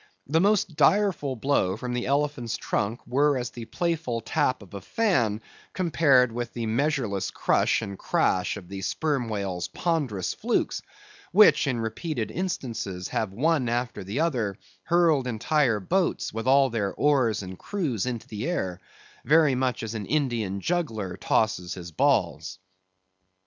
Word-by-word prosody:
The 160 +4 +2
most 200 -4 +2
direful 170 -5 +2
blow 110 -7 +1
from 125 +2 -4
the 120 0 -2
elephant's 140 -4 0
trunk 105 +4 -2
were 145 +2 +2
as 125 -1 -3
the 120 -2 -8
playful 160 -6 -2
tap 115 0 0
of 95 - -17
a 100 - -6
fan, 115 - +1 0.3
compared 140 -7 +3
with 120 0 -4
the 120 -1 -3
measureless 115 -4 0
crush 115 +3 +1
and 100 -2 -6
crash 95 +2 +1
of 95 -4 -10
the 95 +1 -6
sperm 140 +1 -1
whale's 100 -4 -3
ponderous 140 - -1
flukes, - - -1 0.5
which 205 -5 +6
in 125 -3 0
repeated 115 +3 -3
instances 115 - -4
have 110 -4 -1
one 135 +3 +1
after 120 -1 -2
the 105 +11 -2
other 120 - 0 0.3
hurled 165 -6 +3
entire 125 0 +1
boats 175 - 0
with 115 +2 -4
all 135 -1 +5
their 105 -4 -1
oars 130 -8 +2
and 95 0 -8
crews 145 - -2
into 120 -3 -4
the 110 +8 -4
air, 95 - -2 0.4
very 155 -2 +4
much 125 -2 -1
as 115 0 -4
an 105 -3 -5
Indian 120 -10 -1
juggler 115 - -2
tosses 90 -6 0
his 85 -2 -8
balls. 80 +2 +1
120 Hz, 150 wpm, -26 LUFS, 105-150 Hz, 0.5 s, which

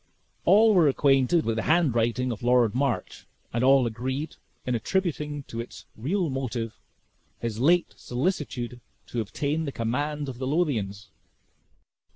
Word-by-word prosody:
All 215 +4 +6
were 175 -5 +5
acquainted 135 +3 +3
with 115 0 0
the - - +1
handwriting 125 -6 +2
of 115 - -5
Lord 120 -2 +3
March, 130 -2 -2 0.3
and 120 +1 0
all 135 -1 +5
agreed 130 +6 -3 0.3
in 125 - 0
attributing 150 - -1
to 115 - -7
its 115 - -10
real 170 - -1
motive 120 -4 -4 0.6
his 115 -2 -4
late 170 +7 +3
solicitude 125 -4 -3 0.2
to 120 - -3
obtain 145 +9 -2
the 140 - -3
command 145 +6 -2
of 125 -2 -7
the 130 - -2
Lothians. 120 - -1
130 Hz, 140 wpm, -26 LUFS, 120-150 Hz, 0.6 s, All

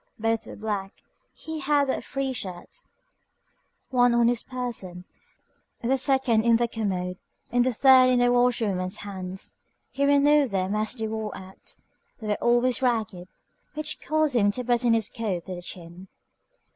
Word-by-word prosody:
Both 225 0 -1
were - - -8
black. 205 -2 -4 0.4
He 320 -1 -7
had 290 0 +2
but 265 - -2
three 275 -1 -3
shirts, 190 - -7 1.1
one 245 -1 +4
on 235 0 +4
his 240 -1 0
person, 225 -9 -5 0.8
the 255 +3 +2
second 260 -4 +2
in 235 0 +4
the 235 +1 +2
commode, 185 -5 -3 0.3
and 245 0 +3
the 255 - +1
third 255 +1 +6
in 250 - +3
the 245 0 +3
washerwoman's 220 -7 +1
hands. 190 -1 -6 0.4
He 280 - -2
renewed 285 0 +4
them 190 -1 -1
as 215 +3 -1
they 225 -2 -3
wore 220 -1 -4
out. 190 0 -11 0.4
They 215 -2 -6
were - - +3
always 240 +2 +2
ragged, 220 -8 -1 0.5
which 305 0 -4
caused 310 -3 0
him 205 -4 +4
to 250 - -4
button 240 -1 +2
his 225 -2 +1
coat 205 -8 -4
to 185 - -6
the 175 - -7
chin. 175 +1 -9
235 Hz, 160 wpm, -25 LUFS, 195-255 Hz, 1.1 s, third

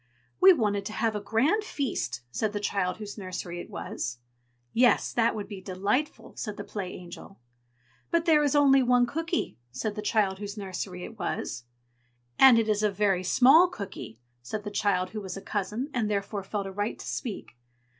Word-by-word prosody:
"We 380 +1 +9
wanted 210 - +1
to 215 - -7
have 225 -1 0
a - - -1
grand 275 - +2
feast!" 255 - -3
said 215 - -1
the 205 - -2
child 195 -3 -1
whose 210 0 -8
nursery 180 -2 -5
it - - -8
was. 125 -1 -5 0.6
"Yes, 245 +1 +3
that 230 -1 +2
would 210 -2 -5
be 200 -3 -8
delightful!" 200 +10 -2
said 210 -3 -5
the 205 - -5
Play 195 -3 -5
Angel. 180 +2 -11 0.7
"But 335 0 +1
there 315 -3 +5
is 290 -1 +1
only 275 -2 +6
one 245 -1 +4
cooky!" 325 - -3
said 210 - -3
the 210 - -5
child 205 -3 +1
whose 205 +1 -6
nursery 185 -2 -5
it 225 -2 -11
was. 120 - -3 0.7
"And 265 -3 +9
it 225 -1 +2
is 210 -1 +1
a 210 - +3
very 195 -2 +1
small 270 - +6
cooky!" 195 - -8 0.2
said 210 - -5
the 205 - -5
child 185 -3 0
who 215 - -5
was 190 -1 -6
a - - -4
cousin, 210 +8 -3
and 230 -5 0
therefore 200 0 -2
felt 200 +1 -3
a 195 - -5
right 205 +3 -2
to - - -9
speak. 215 - -5
210 Hz, 190 wpm, -28 LUFS, 195-245 Hz, 0.7 s, We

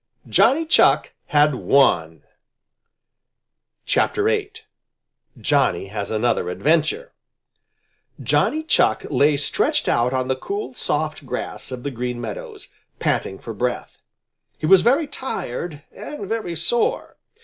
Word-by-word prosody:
Johnny 320 +5 +3
Chuck 320 - +3
had 150 0 +4
won! 85 - +2 1.6
VIII. - - +1 0.9
JOHNNY - - +1
HAS 100 -1 -4
ANOTHER 110 -4 0
ADVENTURE 160 - 0 1.1
Johnny 315 +1 +1
Chuck 315 - +2
lay 145 0 +3
stretched 140 - 0
out 120 +1 +2
on 130 -1 -1
the 130 - 0
cool, 405 - -5
soft - - -2
grass - - -5
of 125 -1 -6
the 140 - -3
Green 125 0 -4
Meadows, 115 -3 -7 0.3
panting 95 - -1
for 115 - -8
breath. 125 +4 -3 0.6
He - - -4
was 185 +3 +7
very 275 +7 +3
tired 175 - -5
and 295 -10 -8
very 220 -5 -3
sore. 225 +9 -1
145 Hz, 115 wpm, -22 LUFS, -, 1.6 s, was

